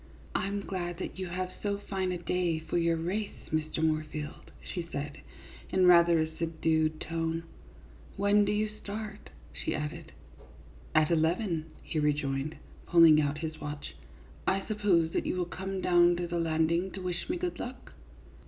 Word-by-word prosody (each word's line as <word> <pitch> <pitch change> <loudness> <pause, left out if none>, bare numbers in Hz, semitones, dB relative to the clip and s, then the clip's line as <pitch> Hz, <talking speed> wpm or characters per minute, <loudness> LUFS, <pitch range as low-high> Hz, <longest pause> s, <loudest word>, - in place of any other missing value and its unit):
" - - -21
I 190 - +1
'm 200 0 -2
glad 175 -3 -3
that 190 - -6
you 185 - -2
have 185 +1 -3
so 200 -1 0
fine 190 -2 -2
a 180 - -1
day 175 -1 0
for 160 +2 -1
your 165 -1 +2
race, 195 +6 -3
Mr. 155 0 0
Moorfield," 155 -1 -2
she 170 -2 -6
said, 145 0 -4 0.5
in 185 -1 +3
rather 170 -1 +7
a 160 0 -2
subdued 160 -1 +1
tone. 165 0 -2 0.4
" - - -21
When 200 +1 +4
do 205 - +1
you 210 +1 +1
start? 210 0 -7
" 75 -1 -21
she 70 -1 -3
added. 155 +2 -5 0.4
" 70 -3 -21
At 155 +1 +4
eleven," 165 +1 +1 0.2
he 155 - -2
rejoined, 145 0 0 0.3
pulling 165 -3 +7
out 145 0 0
his 155 0 -6
watch. 145 0 -6 0.3
" - - -21
I 195 0 +1
suppose 195 -7 +2
that - - -1
you - - 0
will 180 -1 0
come 190 +2 -4
down 175 -1 +5
to 175 0 -2
the 170 0 -2
landing 165 +2 +2
to - - -6
wish 180 - -3
me 350 - 0
good 355 0 -3
luck? 250 +2 -7
170 Hz, 180 wpm, -30 LUFS, 155-190 Hz, 0.5 s, rather